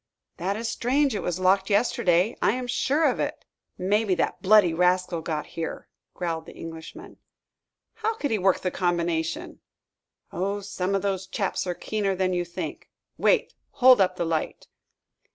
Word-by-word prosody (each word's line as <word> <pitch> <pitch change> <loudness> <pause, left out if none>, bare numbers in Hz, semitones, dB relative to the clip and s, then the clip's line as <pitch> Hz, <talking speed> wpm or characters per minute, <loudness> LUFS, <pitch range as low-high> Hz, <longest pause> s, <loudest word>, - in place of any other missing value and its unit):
"That 195 +4 -2
is 230 +1 -3
strange. 265 +4 +1
It 210 - -2
was 180 0 -2
locked 190 +1 +3
yesterday; 200 -2 +2
I - - +3
am 250 0 -3
sure 270 +5 +1
of - - +2
it." - - -3 0.3
"Maybe 200 +1 +1
that - - -1
bloody 200 -3 +5
rascal 180 0 +1
got 155 -2 -3
here!" 165 -1 -5 0.3
growled 165 -2 -3
the - - -11
Englishman. 165 - -9 0.8
"How 445 0 0
could 285 - -3
he 220 - +1
work 190 0 +2
the 185 - -1
combination?" 170 -2 -1 0.7
"Oh, 195 +4 -2
some 195 -1 -2
of 195 - -1
those 190 -1 -2
chaps 195 -1 -2
are 175 - -2
keener 200 -1 -1
than 185 0 0
you 175 0 0
think. 175 - -6 0.3
Wait, - - +2 0.2
hold 255 -4 +6
up 185 -1 +2
the 175 - -2
light." 165 -1 -2
190 Hz, 165 wpm, -25 LUFS, 175-215 Hz, 0.8 s, hold